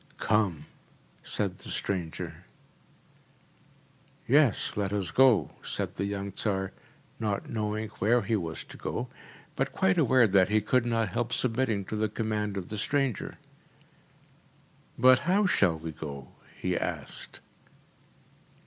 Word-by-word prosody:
‚ÄúCome!‚ÄĚ 105 -7 +1 0.6
said - - -2
the - - -8
stranger. 90 -5 -4 1.8
“Yes, 140 -3 +3
let 100 -2 -1
us 100 -5 -2
go,‚ÄĚ 130 -4 +3
said - - -3
the 100 - -2
young 100 0 -3
Tsar, 95 -1 -1 0.5
not 105 -3 -2
knowing 110 0 -2
where 115 +3 +3
he 110 +3 0
was 85 -6 -3
to - - -12
go, - - -4 0.5
but - - 0
quite 95 - +2
aware 130 -2 +5
that 95 -3 +4
he 110 +1 +4
could 120 +3 +1
not 115 -3 +1
help 120 +3 -1
submitting 115 -5 +1
to 110 - -4
the 110 0 0
command 105 -2 -2
of 95 - -5
the 105 - -4
stranger. 135 -1 -1 1.6
“But 130 0 +7
how 200 +3 +4
shall 85 - +3
we 80 0 -6
go?‚ÄĚ 70 -3 -7 0.3
he - - 0
asked. - - -4
105 Hz, 130 wpm, -29 LUFS, 95-120 Hz, 1.8 s, But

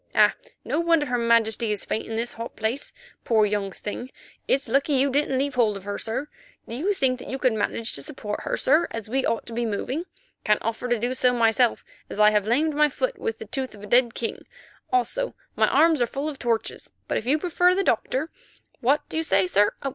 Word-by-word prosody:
Ah! - - +6 0.3
no - - 0
wonder 335 -3 +3
her 250 -3 -1
Majesty 230 -1 +2
is 210 - -1
faint 220 - -3
in 225 - -4
this 235 +2 -2
hot 230 +1 -7
place, 225 +6 -3 0.3
poor 220 -2 +3
young 205 -1 -1
thing. 230 +6 -6 0.4
It's 270 -1 +1
lucky 275 +5 +2
you 275 +1 +3
didn't 275 -1 +1
leave 280 +1 0
hold 225 -5 +2
of 195 - -11
her, 205 0 -4
sir. 230 +6 -3 0.4
Do - - -7
you 365 +12 0
think 255 -5 +1
you 265 - -5
could 255 -3 +2
manage 220 +2 -1
to 140 - -3
support 210 +8 -5
her, - - -2
sir, 310 +5 +3
as 225 -1 -6
we 265 0 +1
ought 230 - -1
to 235 - -8
be 240 +1 -1
moving. 245 - -2 0.4
Can't 210 0 +3
offer 230 +2 -2
to 240 - +2
do 240 +3 -1
so 250 -1 +3
myself, 230 0 +2 0.2
as - - -6
I 210 0 +7
have 210 -1 +1
lamed 300 +7 +2
my 300 +1 +4
foot - - -2
with 455 - -3
the - - -8
tooth 265 -4 -3
of 205 - -13
a - - -6
dead 240 +2 +3
king, 230 - -4 0.4
also - - 0 0.2
my - - +3
arms 320 -4 +4
are 240 - +3
full 275 +5 -4
of 295 -3 -5
torches. 230 -2 -2 0.2
But - - 0
if 225 - -10
you 290 +4 +4
prefer 355 +2 +2
the 390 - +1
Doctor—what 295 - -2
do - - -5
you 320 - +1
say, 195 -10 +3
sir? 205 +3 +2
245 Hz, 225 wpm, -25 LUFS, 220-290 Hz, 0.4 s, I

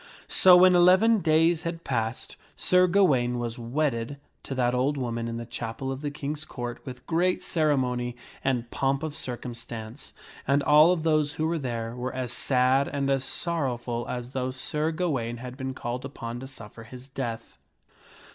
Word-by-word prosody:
So 180 -1 +8
when 185 0 +7
eleven 185 +6 +5
days 165 0 +3
had 170 -1 -5
passed, 115 -3 -3 0.2
Sir 180 0 +4
Ga 195 +3 +4
waine 125 -7 +2
was 120 0 -4
wedded 120 +1 -1 0.2
to 135 - -6
that 125 -1 +1
old 135 +4 +1
woman 115 -3 -2
in 115 0 -4
the 115 - -5
chapel 120 +3 -5
of 135 +1 -5
the 145 - -2
King's 145 +1 -5
Court 120 -5 -6
with 125 -1 -8
great 175 +2 +1
ceremony 125 -6 0 0.3
and 125 -3 -1
pomp 135 +1 0
of 155 -2 -3
circumstance, 120 -2 -6 0.4
and 140 +1 +3
all 150 +3 +6
of 170 -3 0
those 155 -2 +2
who 155 - -2
were 165 0 0
there 120 -3 -4
were 125 +1 -4
as 125 -2 -3
sad 130 +2 +2
and 140 -1 -1
as 135 -1 +1
sorrowful 125 -8 -2
as 125 0 -5
though 130 -1 -2
Sir 150 +4 -1
Gawaine 135 -9 -2
had 125 +1 -8
been 130 -1 -5
called 120 +2 -4
upon 120 -3 -6
to 135 - -8
suffer 115 -4 -11
his 125 +3 -11
death. 120 -4 -6
130 Hz, 175 wpm, -27 LUFS, 120-155 Hz, 0.4 s, So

